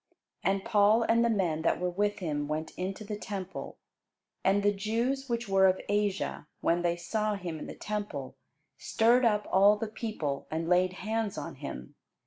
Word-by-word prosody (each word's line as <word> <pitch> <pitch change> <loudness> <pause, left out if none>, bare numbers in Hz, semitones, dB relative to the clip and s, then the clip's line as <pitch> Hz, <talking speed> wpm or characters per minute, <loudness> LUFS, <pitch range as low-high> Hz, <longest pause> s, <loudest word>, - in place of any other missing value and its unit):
And 195 0 +1
Paul 215 +2 +4
and 230 +1 +3
the 235 - +3
men 180 -8 +1
that 165 - +1
were 180 0 -1
with 205 +3 0
him 150 -5 -2
went 155 +1 -3
into 190 +3 -4
the 210 0 -4
temple. 190 -3 -6 0.7
And 195 +1 +3
the 205 0 +4
Jews 235 +7 -1
which 235 -1 -1
were 195 -1 +5
of 185 0 +2
Asia, 205 -6 -1
when 170 +1 +1
they 170 -1 +1
saw 210 +5 -1
him 175 -5 -5
in - - -7
the - - -7
temple, 205 -11 -4 0.4
stirred 240 +3 +3
up 210 -2 +2
all 200 +2 +6
the 225 - -2
people, 210 - -4
and 165 +1 -2
laid 180 +1 +3
hands 220 -2 -1
on - - -5
him. - - -8
200 Hz, 180 wpm, -30 LUFS, 175-215 Hz, 0.7 s, all